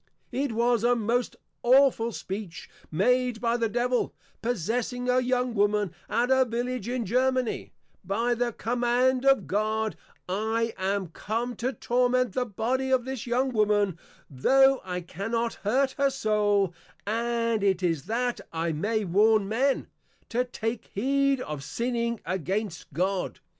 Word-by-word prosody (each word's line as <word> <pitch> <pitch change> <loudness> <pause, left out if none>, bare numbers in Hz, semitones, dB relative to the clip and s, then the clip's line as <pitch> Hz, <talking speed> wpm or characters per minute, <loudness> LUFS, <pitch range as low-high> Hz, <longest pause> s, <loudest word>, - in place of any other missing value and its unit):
It 270 +1 -1
was 235 0 +2
a 245 +1 +4
most 235 +2 0 0.3
awful 250 -2 +4
Speech 190 -5 -6 0.2
made 250 +7 +2
by 235 0 +1
the 230 -2 0
Devil, 245 +2 0 0.3
Possessing 245 +3 -2
a 250 0 +4
young 250 -1 0
Woman, 205 -2 +1 0.2
at 240 +4 +1
a 260 0 +5
Village 240 -1 -3
in 245 -2 -1
Germany, 255 +2 0 0.4
_By 230 +5 +1
the 240 0 0
command 245 +3 +1
of 270 -1 +5
God, 215 +2 0 0.3
I 220 +4 -1
am 190 -1 -1
come 230 +7 -3
to 250 +2 -1
Torment 250 0 +1
the 250 -1 -1
Body 250 +6 -1
of 260 -2 +2
this 260 -3 -5
young 255 +3 +1
Woman, 205 -5 +2 0.3
tho 270 - +4
I 180 -1 -4
cannot 225 +6 -2
hurt 260 +6 +2
her 280 0 +4
Soul; 210 -7 +1 0.3
and 230 0 0
it 190 -2 +2
is 165 -5 0
that 240 +2 -1
I 165 0 -1
may 210 +7 -1
warn 205 +3 +3
Men, 260 +6 +1 0.4
to 245 +2 +1
take 225 -2 -4
heed 275 +4 +2
of 150 - -5
sinning 235 - -2
against 185 +1 -3
God. 185 +5 -1
230 Hz, 140 wpm, -27 LUFS, 205-250 Hz, 0.4 s, a